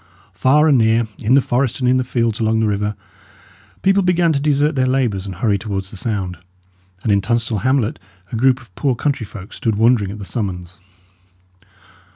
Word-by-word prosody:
Far 150 +4 +3
and 140 -5 +4
near, 115 +1 +3 0.2
in 120 +5 +3
the 140 - +5
forest 125 0 -1
and 125 - 0
in 130 +1 +4
the 130 - +1
fields 115 -3 -1
along 110 0 +1
the 110 - +2
river, 105 0 -1 0.9
people 195 +1 +4
began 175 -3 +2
to 140 - 0
desert 145 +1 +1
their 130 -2 +1
labours 120 -7 0
and 95 - -6
hurry 100 +1 0
towards 95 -2 -4
the - - -10
sound; 95 -4 -3 0.6
and 110 - +1
in 100 -1 +3
Tunstall 115 0 0
hamlet 130 -2 0 0.3
a - - -3
group 130 +2 +3
of 115 -7 -19
poor 135 +4 0
country 130 -4 -2
folk 100 -1 -10
stood 115 -5 -1
wondering 110 -2 +3
at 105 - -7
the 100 - -8
summons. 95 -5 -5
115 Hz, 195 wpm, -19 LUFS, 105-130 Hz, 0.9 s, the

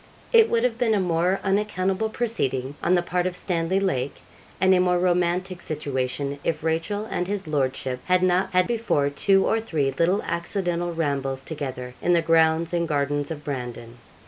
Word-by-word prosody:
It 455 -1 +7
would 230 0 +1
have 235 -2 0
been 225 -3 +2
a - - +2
more 180 +1 +1
unaccountable 195 +1 0
proceeding 140 - -2
on 180 - +3
the 175 - +2
part 180 +1 0
of 180 - -4
Stanley 180 0 -1
Lake, 140 -9 -1 0.4
and 190 +1 +5
a 185 - +4
more 180 0 +3
romantic 180 +1 0
situation, 140 -2 -3
if 155 -2 -2
Rachel 165 +6 -1
and 180 -4 -3
his 200 -1 -3
lordship 135 -3 -1
had 185 0 +2
not 185 +1 +2
had 180 0 +3
before 220 -12 0
two 195 +6 +3
or 225 - +2
three 155 -11 -1
little 170 +8 +1
accidental 175 0 -2
rambles 140 -5 -2
together 130 -5 -5
in 175 - +2
the 170 -1 +3
grounds 165 +1 +3
and 170 -1 0
gardens 145 -1 -1
of 155 -2 -6
Brandon. 120 -4 -6
170 Hz, 175 wpm, -24 LUFS, 145-190 Hz, 0.4 s, It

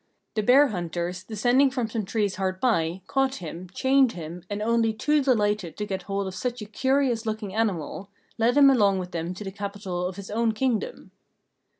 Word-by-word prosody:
The 215 - 0
bear 265 +6 +6
hunters, 175 -1 -3
descending 245 +6 +3
from 255 -3 -2
some 220 -2 -3
trees 205 -1 -1
hard 185 -1 -2
by, 185 -7 +1
caught 270 -1 +1
him, 175 - -7
chained 265 +5 +3
him, 170 +1 -7
and 205 0 -3
only 225 +1 +2
too 295 +7 +2
delighted 210 - +1
to 210 - -2
get 190 -2 -3
hold 200 +1 -3
of 190 - -5
such 245 +5 -3
a 210 - -6
curious 255 +1 0
looking 215 -3 -3
animal, 200 -3 -2 0.3
led 240 +4 +3
him 280 -1 +8
along 205 -6 +3
with 180 -1 -5
them 170 +1 -3
to 210 - -7
the 195 - -5
capital 200 -3 -4
of 185 - -6
his 200 0 -8
own 225 +1 +1
Kingdom. 230 -2 -2
210 Hz, 195 wpm, -26 LUFS, 185-245 Hz, 0.3 s, him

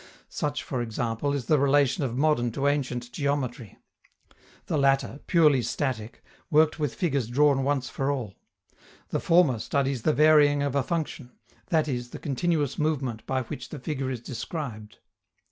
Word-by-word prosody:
Such, 145 -1 -3
for 130 -3 -3
example, 115 +3 -2
is 140 -4 -2
the 150 +3 +3
relation 140 +2 +3
of 125 -2 -2
modern 140 -5 +2
to 140 - -2
ancient 125 -4 -1
geometry. 130 -6 -3 0.9
The 150 - -1
latter, 135 0 +2
purely 150 -7 +4
static, 120 -2 -3 0.3
worked 155 0 +3
with 150 -5 -1
figures 140 -9 0
drawn 135 +2 +3
once 135 -2 0
for 135 0 -2
all; 125 -9 -3 0.8
the - - -1
former 165 -9 +3
studies 135 +1 -1
the 155 - +2
varying 150 -1 +5
of 140 -2 -1
a 140 - +2
function 145 -4 -4 0.3
that 155 -2 +2
is, 125 -3 -3
the - - -8
continuous 150 -1 -1
movement 135 -7 -1
by 130 -1 0
which 120 +1 -7
the 150 - -7
figure 135 -1 -3
is 125 -3 -4
described. 120 -4 -6
140 Hz, 160 wpm, -26 LUFS, 125-150 Hz, 0.9 s, varying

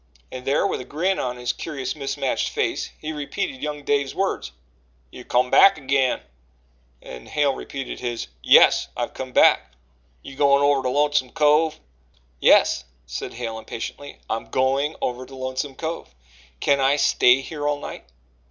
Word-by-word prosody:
And 130 0 -8
there, 140 - +2
with - - -1
a - - -7
grin 180 +9 -1
on 125 -1 -3
his 125 0 -2
curious 135 -5 -5
mismatched 140 -2 -2
face, - - -2
he 155 - -5
repeated 140 -3 -4
young 150 -1 -4
Dave's 140 -1 0
words: 190 - -2 0.6
"You've 125 - -12
come 125 +1 +1
back 195 - +7
agin." 135 -2 +1 0.8
And 60 -1 -10
Hale 145 -2 +1
repeated 135 0 -6
his: 120 -2 -3 0.2
"Yes, - - +6
I've - - -3
come 130 -1 -7
back - - +6
again." - - -28 0.5
"You 135 - -10
goin' 140 0 +4
over 145 -1 +3
to 130 - -1
Lonesome 145 -1 +1
Cove?" 155 0 +3 0.6
"Yes," 65 - +4 0.2
said 60 - -6
Hale 115 -2 -5
impatiently, 140 +5 -7
"I'm 115 - -3
going 135 +4 0
over 125 0 -2
to 135 - -12
Lonesome 130 +1 -4
Cove. 160 - -6 0.4
Can 140 -1 +2
I 135 +1 +3
stay 130 -2 +4
here 145 +1 -5
all 145 0 0
night?" - - -8
135 Hz, 160 wpm, -23 LUFS, 125-145 Hz, 0.8 s, back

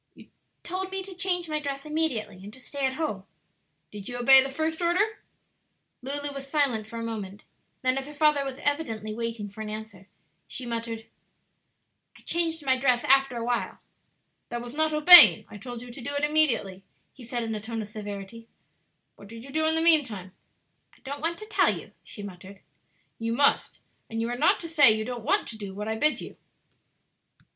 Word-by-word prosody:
"You - - -17 0.3
told 370 +2 -4
me 385 0 -5
to 385 0 -10
change 355 -1 0
my 305 -1 -2
dress 280 -1 -6
immediately 300 -11 -2
and 205 - -10
to 260 - -12
stay 275 +1 -3
at 260 - -4
home." 260 -12 -3 0.7
"Did 205 0 -7
you 245 - -5
obey 265 +2 +7
the 270 - -3
first 315 +4 -3
order?" 400 +6 0 0.8
Lulu 285 +2 -5
was 275 0 -9
silent 270 -8 0
for 230 - -9
a 230 - -5
moment; 210 -3 -6 0.4
then 255 +1 +1
as 270 - -8
her 295 - -10
father 300 -1 +2
was 270 -1 -6
evidently 225 -8 -2
waiting 230 -2 -4
for 205 +2 -11
an 215 - -6
answer, 215 -3 -9 0.4
she 255 - -5
muttered, 230 -1 -5 1.1
"I - - -19
changed 325 -3 -1
my 260 -1 +2
dress 250 -2 +2
after 270 -2 +3
a 230 - -4
while." 240 0 -2 0.7
"That 240 0 -5
was 240 0 -9
not 315 +1 +1
obeying; 305 - +10
I 210 - -9
told 245 +2 -8
you 245 - -11
to 250 - -10
do 285 +4 -5
it 285 - -2
immediately," 250 -11 +1 0.3
he 260 - -14
said 240 0 -4
in 225 -1 -4
a 210 - -5
tone 225 0 -5
of - - -10
severity, 210 +1 -9 0.7
"What 200 - -14
did 225 +2 -11
you 275 - -12
do 315 +2 +1
in 320 - +2
the 320 - +2
mean 325 -2 +6
time?" 195 -7 -9 0.6
"I - - -25
don't 280 +1 -6
want 335 +2 -2
to 430 - -9
tell 430 - +2
you," - - -14
she 205 - -10
muttered. 195 0 -11 0.6
"You 230 0 -2
must; 280 +4 +1 0.3
and 225 - -5
you 230 +1 -2
are 240 - -3
not 325 +10 +2
to 335 - -6
say 295 -7 +7
you 215 0 -1
don't 245 -2 -6
want - - +1
to 220 - -8
do 195 -2 -8
what 210 +1 -6
I 220 - -2
bid 300 +7 +2
you. - - -10
250 Hz, 205 wpm, -26 LUFS, 220-300 Hz, 1.1 s, obeying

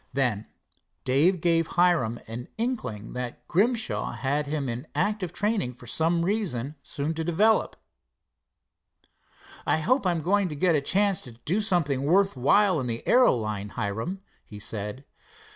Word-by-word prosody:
Then 125 -6 0 0.6
Dave 155 +8 +3
gave 165 -1 +2
Hiram 165 -11 +3
an 115 +2 -6
inkling 215 - -3
that 125 -1 -6
Grimshaw 220 +5 0
had 145 +2 -1
him 145 -2 -2
in 120 +1 -5
active 205 -4 0
training 205 - -1
for 125 - -14
some 165 +6 +1
reason 165 - -1
soon 145 +3 -3
to 160 0 -3
develop. 200 +7 +2 1.9
"I - - +2
hope 195 - +1
I'm 170 -2 +1
going 195 +2 +2
to 150 - -5
get 170 +4 +2
a 150 - +2
chance 195 +4 +2
to 125 - -9
do 190 +8 +1
something 170 -10 +1
worth 195 +5 +3
while 180 +8 +3
in 130 - -3
the 115 -1 -4
aero 250 - +5
line, 105 -3 -3
Hiram," 115 - -3 0.2
he 105 - -11
said. 105 +5 -4
160 Hz, 150 wpm, -26 LUFS, 125-195 Hz, 1.9 s, aero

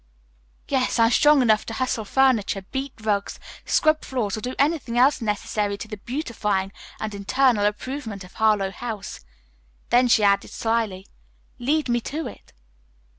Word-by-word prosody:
"Yes, 260 -3 0
I'm 230 0 +4
strong 295 +1 +5
enough 215 -3 +3
to 225 - -5
hustle 235 -3 -1
furniture, 225 -6 +2
beat 270 0 -3
rugs, 205 -2 -1 0.3
scrub 310 0 +2
floors, 230 -7 -2
or 215 - -6
do 250 +3 -4
anything 280 -5 0
else 265 +2 +4
necessary 210 -1 -1
to 215 - -7
the 210 -1 -7
beautifying 210 -6 -2 0.3
and 215 -1 -4
eternal 205 +2 +2
improvement 220 -1 -5
of 180 - -14
Harlowe 210 -3 +2
House." 220 -2 -6 0.7
Then 245 +1 +5
she 225 -3 +4
added 200 -1 +3
slyly, 225 -5 -2 0.5
"Lead 295 +5 0
me 240 -1 +1
to 310 +7 -4
it." - - -10
230 Hz, 150 wpm, -23 LUFS, 205-260 Hz, 0.7 s, strong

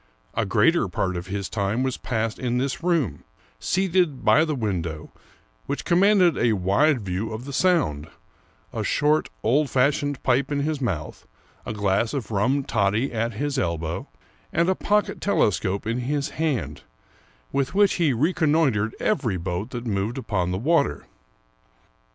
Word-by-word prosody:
A 110 -3 -1
greater 165 - +3
part 90 +1 -2
of 90 +1 -5
his 100 0 -3
time 105 +4 -1
was 130 -1 -1
passed 115 -2 -3
in 125 -1 -1
this 130 +3 -2
room, 170 - 0 0.4
seated 180 -6 0
by 155 - +6
the 155 -2 -1
window, 85 - -3 0.6
which - - -3
commanded 180 -3 +4
a 120 -2 +3
wide 105 +9 +2
view 95 +3 -3
of 110 +3 -6
the 140 - -7
Sound, 135 - +1 0.7
a - - -2
short, 150 +2 +1
old 135 +6 +2
fashioned 145 +2 +1
pipe 130 +2 +1
in 140 -1 0
his 150 -1 -2
mouth, 85 - -4 0.4
a - - -3
glass 105 +4 0
of 130 -4 -4
rum 120 +8 +1
toddy 110 +2 +1
^ - - -13
at 115 +1 -1
his 140 +5 -2
elbow, 85 -1 -2 0.4
and 170 +2 +2
a - - +4
pocket 210 +2 0
telescope 100 - +1
in 115 +3 -1
his 140 +3 -1
hand, 120 - -2 0.7
with 140 +4 -1
which 205 -1 +4
he 155 -4 +4
reconnoitered 145 - +1
every 125 - 0
boat 90 +5 -3
that 120 -1 -6
moved 105 +3 -2
upon 100 -9 -1
the 90 - -1
water. 120 - +1
125 Hz, 155 wpm, -24 LUFS, 100-150 Hz, 0.7 s, by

